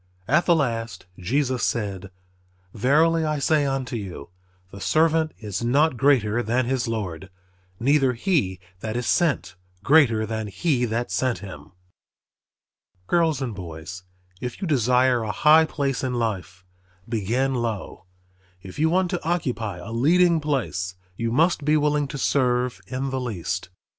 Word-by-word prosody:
At 155 Hz, +8 st, +2 dB
the 170 Hz, -, +6 dB
last 115 Hz, -, -2 dB
Jesus 130 Hz, +6 st, 0 dB
said, 100 Hz, -4 st, -2 dB, 0.6 s
"Verily 155 Hz, +8 st, +3 dB
I 155 Hz, -1 st, 0 dB
say 145 Hz, +1 st, +2 dB
unto 135 Hz, -2 st, -2 dB
you, 95 Hz, -9 st, -7 dB, 0.4 s
the 100 Hz, -, -10 dB
servant 160 Hz, +2 st, +2 dB
is 105 Hz, -1 st, -5 dB
not 140 Hz, +5 st, +3 dB
greater 120 Hz, -4 st, +2 dB
than 120 Hz, +2 st, 0 dB
his 125 Hz, -1 st, -1 dB
Lord; 95 Hz, -5 st, -4 dB, 0.5 s
neither 135 Hz, 0 st, +3 dB
he 120 Hz, -, 0 dB, 0.2 s
that 110 Hz, +3 st, -4 dB
is 120 Hz, -, -2 dB
sent 145 Hz, -, +1 dB, 0.3 s
greater 130 Hz, -8 st, +4 dB
than 110 Hz, -1 st, -4 dB
he 125 Hz, -, 0 dB
that 120 Hz, +1 st, -2 dB
sent 130 Hz, -2 st, 0 dB
him." 95 Hz, -1 st, -11 dB, 1.3 s
Girls 160 Hz, -, +1 dB
and 120 Hz, -4 st, -3 dB
boys, 90 Hz, -1 st, -8 dB, 0.4 s
if 125 Hz, -1 st, -6 dB
you 190 Hz, -, -3 dB
desire 125 Hz, -3 st, +3 dB
a 110 Hz, -2 st, -2 dB
high 155 Hz, +7 st, +5 dB
place 140 Hz, -4 st, -2 dB
in 130 Hz, -1 st, -1 dB
life, 95 Hz, -6 st, -3 dB, 0.4 s
begin 120 Hz, +4 st, 0 dB
low. 115 Hz, -6 st, -4 dB, 0.6 s
If 95 Hz, +5 st, -10 dB
you 160 Hz, +1 st, +3 dB
want 180 Hz, +1 st, +1 dB
to 175 Hz, -, -3 dB
occupy 125 Hz, -, -2 dB
a 90 Hz, +6 st, -8 dB
leading 165 Hz, +8 st, +3 dB
place 110 Hz, -11 st, -2 dB, 0.2 s
you 115 Hz, +3 st, -2 dB
must 160 Hz, +4 st, +2 dB
be 150 Hz, +2 st, +3 dB
willing 150 Hz, -1 st, +1 dB
to 140 Hz, -, -6 dB
serve 125 Hz, -2 st, +1 dB
in 130 Hz, +1 st, -3 dB
the 130 Hz, -1 st, -2 dB
least. 95 Hz, -6 st, -4 dB
125 Hz, 150 wpm, -24 LUFS, 110-150 Hz, 1.3 s, the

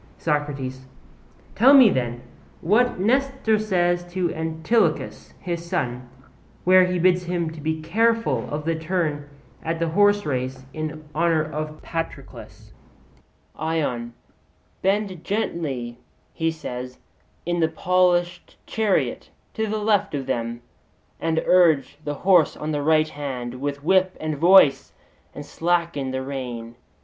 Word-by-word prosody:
SOCRATES: 140 Hz, -4 st, -3 dB, 0.7 s
Tell 265 Hz, +6 st, +6 dB
me 255 Hz, -7 st, +8 dB
then, 120 Hz, -1 st, -2 dB, 0.4 s
what 220 Hz, +6 st, +2 dB
Nestor 255 Hz, 0 st, +1 dB
says 175 Hz, -4 st, +1 dB
to 180 Hz, -2 st, -1 dB
Antilochus, 160 Hz, +8 st, -1 dB
his 170 Hz, -2 st, -4 dB
son, 125 Hz, -7 st, -3 dB, 0.5 s
where 185 Hz, 0 st, +6 dB
he 180 Hz, 0 st, -1 dB
bids 180 Hz, 0 st, +2 dB
him 175 Hz, -1 st, -1 dB
be 160 Hz, 0 st, -3 dB
careful 230 Hz, +7 st, +1 dB
of 150 Hz, +1 st, -4 dB
the 165 Hz, -, +1 dB
turn 160 Hz, -3 st, -2 dB, 0.3 s
at 165 Hz, 0 st, -2 dB
the 165 Hz, 0 st, -1 dB
horserace 150 Hz, -10 st, +1 dB
in 155 Hz, 0 st, -6 dB
honour 165 Hz, 0 st, +2 dB
of 155 Hz, 0 st, -6 dB
Patroclus. 165 Hz, -1 st, -7 dB, 0.8 s
ION: 145 Hz, -7 st, -2 dB, 0.7 s
'Bend 195 Hz, -3 st, -1 dB
gently,' 140 Hz, -, -3 dB, 0.3 s
he 165 Hz, -1 st, 0 dB
says, 125 Hz, -5 st, -6 dB, 0.5 s
'in 175 Hz, 0 st, -1 dB
the 160 Hz, -1 st, +2 dB
polished 175 Hz, +1 st, 0 dB
chariot 215 Hz, -3 st, -1 dB, 0.2 s
to 220 Hz, -1 st, -2 dB
the 215 Hz, +1 st, -2 dB
left 210 Hz, -6 st, +1 dB
of 135 Hz, -2 st, -3 dB
them, 120 Hz, -2 st, -3 dB, 0.6 s
and 160 Hz, 0 st, 0 dB
urge 165 Hz, -6 st, +3 dB
the 145 Hz, 0 st, -3 dB
horse 180 Hz, -4 st, +4 dB
on 155 Hz, +1 st, -4 dB
the 145 Hz, -1 st, -1 dB
right 155 Hz, +1 st, +3 dB
hand 130 Hz, -4 st, -6 dB
with 140 Hz, 0 st, -3 dB
whip 185 Hz, +2 st, +2 dB
and 155 Hz, -1 st, -3 dB
voice; 170 Hz, -6 st, +5 dB, 0.4 s
and 145 Hz, -, -7 dB
slacken 170 Hz, -4 st, -1 dB
the 130 Hz, 0 st, -3 dB
rein. 125 Hz, -4 st, -6 dB
160 Hz, 125 wpm, -23 LUFS, 145-185 Hz, 0.8 s, me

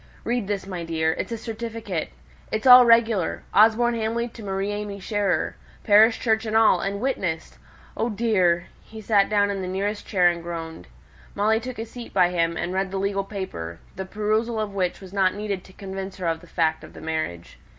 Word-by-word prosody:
Read 240 Hz, -3 st, -1 dB
this, 200 Hz, -2 st, -2 dB
my 180 Hz, -3 st, -5 dB
dear. 160 Hz, -1 st, 0 dB
It's -, -, -3 dB
a 230 Hz, -, -2 dB
certificate. 225 Hz, -5 st, -5 dB, 0.4 s
It's 220 Hz, +2 st, -2 dB
all 250 Hz, -1 st, +10 dB
regular 230 Hz, -5 st, +3 dB
Osborne 225 Hz, +3 st, +5 dB
Hamley 230 Hz, +1 st, -1 dB
to 230 Hz, -, -12 dB
Marie 195 Hz, 0 st, -2 dB
AimÄe 205 Hz, -1 st, -5 dB
Scherer, 195 Hz, -3 st, -1 dB, 0.3 s
parish 220 Hz, +2 st, +5 dB
church 220 Hz, -2 st, +1 dB
and 220 Hz, +1 st, +2 dB
all, 220 Hz, -5 st, +5 dB
and 200 Hz, +2 st, -2 dB
witnessed. 190 Hz, -10 st, -3 dB, 0.4 s
Oh, 230 Hz, -, -1 dB
dear!" 190 Hz, -6 st, +2 dB, 0.2 s
He 220 Hz, -, -11 dB
sate 205 Hz, -2 st, +2 dB
down 205 Hz, -1 st, +2 dB
in 195 Hz, -1 st, -3 dB
the 185 Hz, -, -4 dB
nearest 200 Hz, +3 st, -3 dB
chair 180 Hz, -3 st, +3 dB
and 170 Hz, -1 st, +1 dB
groaned. 165 Hz, -, -7 dB, 0.5 s
Molly 215 Hz, +2 st, +2 dB
took 245 Hz, +1 st, -7 dB
a 225 Hz, -, -4 dB
seat 235 Hz, +1 st, -10 dB
by 175 Hz, -, +4 dB
him, 170 Hz, -1 st, 0 dB
and 180 Hz, -, -3 dB
read 190 Hz, 0 st, 0 dB
the 195 Hz, -, -4 dB
legal 195 Hz, 0 st, -1 dB
paper, 85 Hz, -, -6 dB, 0.2 s
the 190 Hz, -, -5 dB
perusal 215 Hz, +3 st, -1 dB
of 210 Hz, -2 st, -3 dB
which 185 Hz, -2 st, -1 dB
was 190 Hz, -1 st, -11 dB
not 190 Hz, -1 st, +2 dB
needed 205 Hz, -3 st, -3 dB
to -, -, -15 dB
convince 190 Hz, 0 st, -7 dB
her 185 Hz, -, -5 dB
of 165 Hz, -1 st, 0 dB
the 175 Hz, -, -16 dB
fact 160 Hz, -1 st, 0 dB
of -, -, -12 dB
the -, -, -11 dB
marriage. 155 Hz, -, -4 dB
200 Hz, 200 wpm, -24 LUFS, 180-220 Hz, 0.5 s, all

